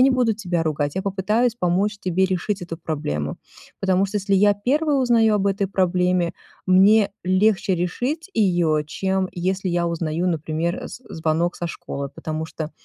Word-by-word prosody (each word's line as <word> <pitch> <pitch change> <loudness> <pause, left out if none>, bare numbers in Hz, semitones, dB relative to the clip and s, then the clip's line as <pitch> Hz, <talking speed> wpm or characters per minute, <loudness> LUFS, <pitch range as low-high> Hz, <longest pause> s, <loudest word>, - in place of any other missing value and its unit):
не 260 - +7
буду 250 -3 +2
тебя 180 -6 -2
ругать, 145 -2 -1
я 190 - -2
попытаюсь 210 +5 +1
помочь 200 +2 0
тебе 185 0 +1
решить 190 +1 -1
эту 165 -2 -6
проблему. 75 - -3 0.4
Потому 190 0 +2
что 210 - -4
если 200 0 -2
я 205 +1 +5
1 285 +8 +1
узнаю 235 -4 +3
об 200 -1 +1
этой 200 0 +1
проблеме, 180 -2 +1 0.3
мне 200 +3 +5
легче 190 +1 +2
решить 255 - -2
её, 175 -7 +2
чем 190 +5 -1
если 185 +2 -2
я 175 0 0
узнаю, 165 +1 -1
например, 165 +1 -2
з 250 - -10
звонок 160 +2 0
со 175 - -3
школы, 140 -4 -5
потому 155 +3 -5
что 160 -1 -6
185 Hz, 165 wpm, -22 LUFS, 170-205 Hz, 0.4 s, не